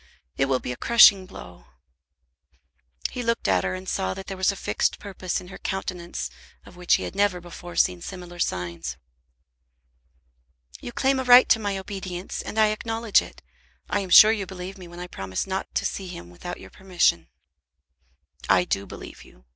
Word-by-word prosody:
It 135 - +2
will 135 -1 +1
be 125 - -5
a - - -4
crushing 200 - +6
blow." 90 - -12 1.5
He 250 - -4
looked 230 -1 -1
at 95 -2 +2
her, 95 0 -1
and 95 0 -9
saw 95 0 -1
that 195 - -8
there 195 - -6
was 190 +1 +2
a - - -7
fixed - - -1
purpose 190 -3 -4
in 180 - -12
her - - -10
countenance 180 -2 -4 0.3
of - - -15
which 180 -1 +3
he - - -3
had - - -5
never 200 -2 +2
before 175 0 -10
seen 90 -1 +2
similar 175 -2 -9
signs. 85 - -3 1.8
"You 240 - -7
claim 265 +2 +1
a - - -1
right 250 0 +8
to 225 - +5
my 205 -2 -2
obedience, 190 -2 -6
and - - -7
I 215 -1 +5
acknowledge 225 0 +1
it. - - -12 0.5
I 205 - +2
am 195 -2 -5
sure 215 +4 +9
you 205 -4 -2
believe 185 0 -7
me 185 -3 -11
when 175 0 -11
I 180 - -5
promise 95 - -4
not 190 0 -3
to - - 0
see 195 - -3
him 85 - -9
without 175 - -7
your - - -13
permission." 175 - +1 1.2
"I 95 -2 +5
do 100 +2 -2
believe - - -10
you. - - -20
180 Hz, 185 wpm, -25 LUFS, 125-200 Hz, 1.8 s, sure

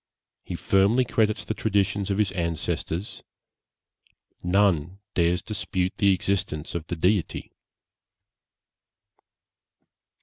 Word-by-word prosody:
He - - -5
firmly 100 +6 +3
credits 110 -2 +1
the - - -2
traditions 100 -2 0
of 100 - 0
his 105 -3 +2
ancestors. 85 +1 -3 1.2
None 90 -2 +2 0.2
dares 85 +1 +2
dispute 95 -3 -2
the 100 -1 +4
existence 90 -4 -1
of 85 -2 -4
the 85 - -3
Deity.' 90 +3 0
95 Hz, 95 wpm, -26 LUFS, 85-105 Hz, 1.2 s, the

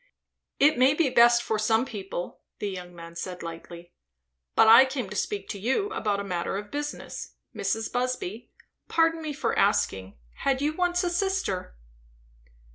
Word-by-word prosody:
"It 290 -3 +4
may 265 +3 +5
be 300 -5 +2
best 235 0 +6
for 220 - -1
some 220 +3 +2
people," 195 -6 -6 0.2
the 205 - -3
young 180 -1 -8
man 170 0 -11
said 180 +1 -6
lightly. 170 +1 -9 0.6
"But 225 - +6
I 230 +4 +10
came 260 -4 -3
to - - -6
speak 200 0 -2
to 200 - -5
you 265 - 0
about 210 - -1
a - - -3
matter 180 -1 -2
of 205 0 -7
business. 295 0 -6 0.2
Mrs. 225 0 -2
Busby, 245 -4 -3 0.4
pardon 330 0 +2
me 310 -1 -4
for 265 -5 -2
asking, 95 - +1 0.2
had 270 -1 0
you 295 +2 0
once 355 +1 0
a 355 - 0
sister?" 355 - -1
225 Hz, 165 wpm, -27 LUFS, 190-290 Hz, 0.6 s, I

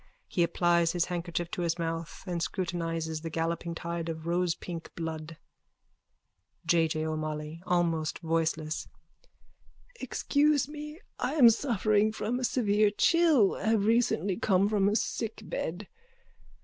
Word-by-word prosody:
He 175 - -1
applies 170 0 +2
his 175 -1 +1
handkerchief 175 -1 -3
to - - -3
his 170 0 0
mouth 165 -1 -4
and 175 -3 -3
scrutinises 165 -3 -2
the 165 - -4
galloping 165 +1 -2
tide 170 0 -4
of 160 -1 -5
rosepink 175 -1 -2
blood.)_ 160 -1 -5 1.3
J. 165 0 +3
J. 155 0 -2
O'MOLLOY: 155 0 -4
(Almost 165 -3 +1
voicelessly.) 160 -1 -1 1.1
Excuse 290 -2 +1
me. 300 +1 -8 0.2
I - - -1
am 245 -7 +8
suffering 215 -3 +2
from 220 +3 -2
a - - -4
severe 215 -4 +3
chill, 300 - +4
have 215 -1 +1
recently 215 -5 +2
come 195 -1 +3
from 205 -2 +2
a 210 - 0
sickbed. 210 -5 -3
175 Hz, 125 wpm, -29 LUFS, 165-215 Hz, 1.3 s, am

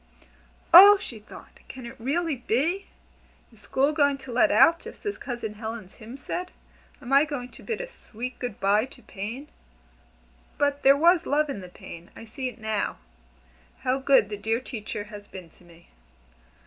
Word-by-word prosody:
"Oh!" 400 +4 +11
she 240 - -8
thought, 210 - -15
"can 260 -2 -9
it 235 - -9
really 305 +6 -1
be? 285 - -1 0.7
Is 220 - -18
School 265 +8 +1
going 285 -2 +2
to 255 - -8
'let 300 +7 +4
out,' 335 +2 +5
just - - -12
as 410 -1 -3
Cousin 235 -4 -5
Helen's 220 -2 -7
hymn 230 +4 -11
said? 355 +6 -5 0.5
Am 250 +2 -5
I 280 +1 +7
going 285 -5 -5
to - - -15
'Bid 465 +1 -4
a - - -4
sweet 250 - -8
good 245 -5 -5
bye 205 +3 +3
to 265 - -16
Pain?' 230 +7 -7 1.1
But 285 0 0
there 275 +1 +6
was 340 +2 +4
Love 295 0 +1
in 235 - -5
the 180 - -10
Pain. 170 -1 -12
I 225 - -10
see 255 +3 -5
it 250 - -13
now. 220 -2 -2 0.8
How 260 +1 0
good 265 -6 +4
the 205 - -5
dear 225 +3 -1
Teacher 215 -5 -6
has 205 -1 -11
been 180 -4 -11
to - - -23
me!" 170 0 -19
250 Hz, 180 wpm, -26 LUFS, 215-290 Hz, 1.1 s, Oh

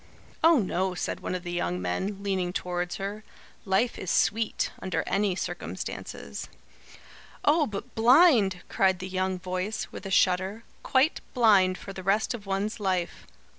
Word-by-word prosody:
"Oh, 325 0 +7
no," 185 -3 0
said - - -3
one - - -3
of 180 - -5
the 175 - -5
young 90 - -1
men, 190 - -3
leaning 190 -3 -1
towards 180 -1 -2
her. 200 +2 -5 0.4
"Life 195 +5 +1
is 190 - -5
sweet, 220 +3 +1
under 185 - -1
any 195 -2 +1
circumstances." - - -5 1.0
"Oh, 300 0 +4
but 200 -2 -7
blind!" 230 - +5
cried 190 -1 +2
the 185 +1 -6
young 185 0 -1
voice, 185 +4 -3
with - - -7
a - - -5
shudder. 190 +3 +2 0.2
"Quite 270 +3 +2
blind 200 -6 +5
for 195 - -9
the 190 - -7
rest 195 +6 +1
of 210 -4 -8
one's 200 +3 -2
life. 185 -4 -2
195 Hz, 155 wpm, -27 LUFS, 185-215 Hz, 1.0 s, Oh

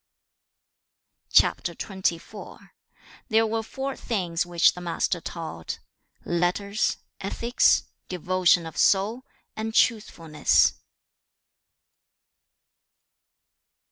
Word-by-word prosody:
CHAP. - - +4
XXIV. 190 0 -5 0.6
There 225 0 +4
were 225 +1 -1
four 265 +4 -5
things 180 -6 -2
which 175 -1 +4
the 180 - -9
Master 175 0 -1
taught, 160 - -6 0.5
letters, 180 +4 0 0.2
ethics, 235 +5 +2 0.3
devotion 180 -1 +2
of 160 - -9
soul, 210 +6 +2 0.3
and 220 +1 -4
truthfulness. 165 -10 +2
185 Hz, 75 wpm, -25 LUFS, 170-220 Hz, 0.6 s, CHAP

